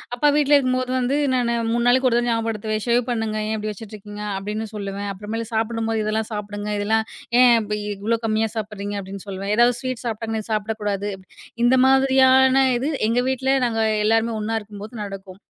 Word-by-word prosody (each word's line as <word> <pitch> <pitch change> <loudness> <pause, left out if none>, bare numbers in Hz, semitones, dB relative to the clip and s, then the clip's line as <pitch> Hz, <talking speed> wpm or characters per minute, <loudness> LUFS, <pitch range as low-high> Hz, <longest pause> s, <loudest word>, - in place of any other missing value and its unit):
அப்பா 295 +4 +3
வீட்ல 290 0 +4
இருக்கும்போது 255 -1 0
வந்து 255 +3 0 0.2
நானு 235 -1 +1 0.2
3 235 +1 +1
நாளுக்கு 255 +1 +4
ஒரு 235 - +2
தடவ 240 0 0
ஞாபகப்படுத்துவேன். 220 -2 -1
"சேவ் 235 +1 +3
பண்ணுங்க! 225 -2 -2
ஏன் 220 - 0
இப்டி 215 0 -3
வச்சிட்ருக்கீங்க" 210 0 -9
அப்டின்னு 210 +3 -4
சொல்லுவேன். 200 0 -4
அப்பறமேலு, 215 +3 -5
சாப்புடும்போது 225 0 -1
"இதெல்லாம் 215 +1 -1
சாப்டுங்க. 205 0 -5
இதெல்லாம். 220 +2 +1 0.4
ஏன் 235 -4 +5
பி 210 - 0 0.2
இவ்ளோ 225 +3 0
கம்மியா 220 +1 +1
சாப்பிட்றீங்க" 205 -1 -4
அப்டின்னு 195 +1 -9
சொல்லுவேன். 195 +1 -3
ஏதாவது 240 0 +4
ஸ்வீட் 255 -2 -4
சாப்பட்டாங்கன்னா 220 -1 -3
"சாப்டக்கூடாது." 210 -1 -2 0.6
இந்த 255 +2 +5
மாதிரியான 265 0 +5
இது, 275 +5 -1 0.2
எங்க 245 +2 +2
வீட்ல 265 +1 +1
நாங்க 225 -1 0 0.2
எல்லாருமே 225 +1 +2
ஒண்ணா 225 +1 -1
இருக்கும்போது 210 +2 -10
நடக்கும். 195 -1 -9
220 Hz, 165 wpm, -22 LUFS, 210-240 Hz, 0.6 s, ஏன்